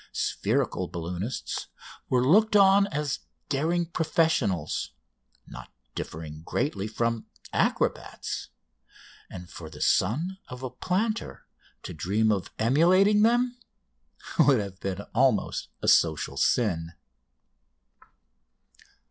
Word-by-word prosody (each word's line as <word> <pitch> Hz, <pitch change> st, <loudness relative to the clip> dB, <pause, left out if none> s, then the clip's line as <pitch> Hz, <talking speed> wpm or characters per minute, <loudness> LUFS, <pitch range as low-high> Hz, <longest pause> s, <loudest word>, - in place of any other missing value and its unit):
Spherical -, -, -1 dB
balloonists 90 Hz, +7 st, -4 dB, 0.4 s
were 125 Hz, -1 st, +2 dB
looked 210 Hz, +9 st, +4 dB
on 200 Hz, 0 st, +6 dB
as 150 Hz, -4 st, -2 dB, 0.3 s
daring 165 Hz, +5 st, +1 dB
professionals, 135 Hz, -, 0 dB, 0.5 s
not -, -, -11 dB, 0.2 s
differing 75 Hz, -1 st, -7 dB
greatly 100 Hz, -, -2 dB
from 115 Hz, +1 st, -2 dB, 0.3 s
acrobats; -, -, -1 dB, 0.8 s
and 90 Hz, -1 st, -9 dB
for 80 Hz, -2 st, -9 dB
the 75 Hz, -1 st, -12 dB
son 170 Hz, -, +1 dB
of 125 Hz, +1 st, -9 dB
a 130 Hz, -, -4 dB
planter 200 Hz, -, -2 dB, 0.4 s
to -, -, -6 dB
dream 105 Hz, +7 st, +1 dB
of 100 Hz, -3 st, -1 dB
emulating 185 Hz, -, +4 dB
them 245 Hz, +2 st, +2 dB, 0.8 s
would 135 Hz, -4 st, +6 dB
have 100 Hz, -2 st, -6 dB
been 95 Hz, -2 st, -3 dB
almost -, -, +1 dB, 0.2 s
a -, -, -1 dB
social -, -, +3 dB
sin. 85 Hz, -8 st, +1 dB
125 Hz, 100 wpm, -27 LUFS, -, 0.8 s, on